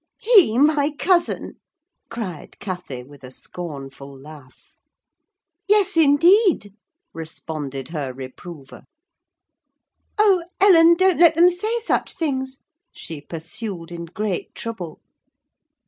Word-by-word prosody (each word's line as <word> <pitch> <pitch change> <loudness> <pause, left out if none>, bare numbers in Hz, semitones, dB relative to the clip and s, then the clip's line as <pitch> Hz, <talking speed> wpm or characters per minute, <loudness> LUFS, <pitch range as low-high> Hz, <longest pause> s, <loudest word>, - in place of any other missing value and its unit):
"He 395 - +5
my 295 +1 +3
cousin!" 345 -1 0 0.5
cried 205 -9 -7
Cathy, 180 -10 -6
with 140 +1 -17
a 130 - -9
scornful 140 -2 -9
laugh. 140 -2 -16 0.9
"Yes, 405 -2 +3
indeed," 325 - +4 0.4
responded 155 -4 -6
her 145 -5 -4
reprover. 135 +3 -11 1.3
"Oh, 400 -4 +4 0.2
Ellen! 340 -4 +6
don't 370 0 +2
let 335 -2 +6
them 350 +2 +6
say 430 +7 -2
such 455 - -1
things," 265 -5 -3 0.3
she 160 -3 -8
pursued 170 +3 -7
in 170 0 -6
great 200 +1 -4
trouble. 195 -8 -7
205 Hz, 100 wpm, -21 LUFS, -, 1.3 s, Ellen